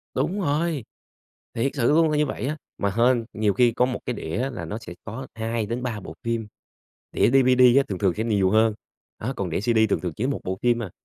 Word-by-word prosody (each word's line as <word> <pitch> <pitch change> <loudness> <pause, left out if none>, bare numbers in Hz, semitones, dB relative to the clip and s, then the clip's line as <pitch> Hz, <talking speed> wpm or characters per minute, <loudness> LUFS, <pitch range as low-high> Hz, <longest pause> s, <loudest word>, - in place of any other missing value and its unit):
Đúng 200 +3 0
rồi, 155 -3 0 0.7
thiệt 135 +4 0
sự 120 -4 +1
luôn 160 0 +4
là 150 - +1
như 150 - +3
vậy 135 - -4
á. 150 +2 -2 0.2
Mà 100 - 0
hên, 120 0 +3
nhiều 105 -1 +1
khi 120 -2 +4
có 125 - +2
một 125 - -3
cái 125 - -1
đĩa 115 +9 -3
là 120 - -6
nó 105 - -5
sẽ 90 -6 -10
có 130 +5 -6
2-3 115 0 -3
bộ 80 - -9
phim, 115 -2 -1 0.7
đĩa - - +3
DVD 130 -1 +5
á 140 - +6
thường 95 -3 -3
thường 95 -4 +1
sẽ 110 - -1
nhiều 100 -4 +2
hơn, 110 0 +3 0.4
á, 125 +5 -3
còn 95 -3 -3
đĩa 85 - -1
CD 115 +1 +1
thường - - 0
thường 90 -3 -3
chỉ 115 - -2
có 140 - +1
1 - - -3
bộ 95 +1 -3
phim 120 -1 +2
à. 95 - -5
115 Hz, 240 wpm, -24 LUFS, 105-130 Hz, 0.7 s, á